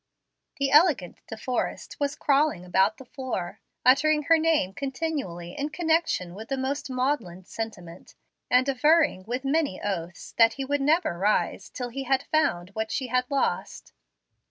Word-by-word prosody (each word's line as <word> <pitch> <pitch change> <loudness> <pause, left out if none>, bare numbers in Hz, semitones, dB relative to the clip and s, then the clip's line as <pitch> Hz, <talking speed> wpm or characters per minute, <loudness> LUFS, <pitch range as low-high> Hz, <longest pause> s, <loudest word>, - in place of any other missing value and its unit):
The 275 -1 0
elegant 295 - +4
De 220 - -7
Forrest 250 +2 -3
was 285 0 -1
crawling 280 - +1
about 190 +4 +2
the 265 - -12
floor, 245 -10 -5 0.3
uttering 300 +4 +4
her 330 +2 +4
name 315 - +1
continually 270 - -4
in 290 +2 -2
connection 320 - 0
with 220 +4 -9
the 270 - -1
most 275 +2 -3
maudlin 255 -9 -2
sentiment, 185 -7 -8 0.3
and 255 +2 +4
averring 295 - +3
with 250 +4 -4
many 285 -7 0
oaths 175 -4 -5
that 225 0 +6
he 275 - -4
would 285 +1 0
never 305 - +1
rise 210 +3 0
till 250 -2 -5
he 270 +3 -5
had 265 +1 +1
found 185 - 0
what 220 +2 -3
she 260 -3 -2
had 250 +1 0
lost. 280 -1 -2
260 Hz, 155 wpm, -26 LUFS, 205-290 Hz, 0.3 s, that